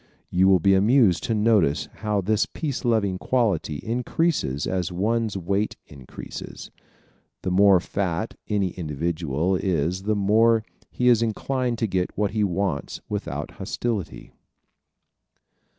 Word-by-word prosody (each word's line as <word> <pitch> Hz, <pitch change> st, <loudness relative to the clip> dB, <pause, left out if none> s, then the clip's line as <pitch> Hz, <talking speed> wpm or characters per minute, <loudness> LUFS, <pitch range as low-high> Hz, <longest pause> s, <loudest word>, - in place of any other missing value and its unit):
You 95 Hz, +1 st, +4 dB
will 95 Hz, -1 st, +6 dB
be 95 Hz, +3 st, +4 dB
amused 105 Hz, -1 st, +4 dB
to 115 Hz, -3 st, 0 dB
notice 105 Hz, -9 st, +2 dB
how 105 Hz, -2 st, -1 dB
this 105 Hz, +3 st, +1 dB
peace 145 Hz, -5 st, -4 dB
loving 105 Hz, -6 st, +1 dB
quality 105 Hz, -, 0 dB
increases 120 Hz, -, -1 dB
as 90 Hz, -2 st, -2 dB
one's 110 Hz, +3 st, 0 dB
weight 100 Hz, +4 st, -1 dB
increases. 70 Hz, -3 st, -9 dB, 0.7 s
The 95 Hz, -, -1 dB
more 95 Hz, 0 st, +6 dB
fat 95 Hz, +2 st, -2 dB
any 100 Hz, -3 st, 0 dB
individual 80 Hz, +1 st, -2 dB
is 90 Hz, -1 st, -1 dB
the 105 Hz, +2 st, 0 dB
more 110 Hz, +3 st, +3 dB, 0.3 s
is 125 Hz, -2 st, +4 dB
he 115 Hz, -, +2 dB
inclined 125 Hz, +2 st, -2 dB
to 115 Hz, -, 0 dB
get 95 Hz, -2 st, -2 dB
what 105 Hz, -1 st, 0 dB
he 105 Hz, 0 st, 0 dB
wants 95 Hz, -6 st, -2 dB
without -, -, -4 dB
hostility. 115 Hz, -7 st, -4 dB
100 Hz, 130 wpm, -24 LUFS, 90-115 Hz, 0.7 s, will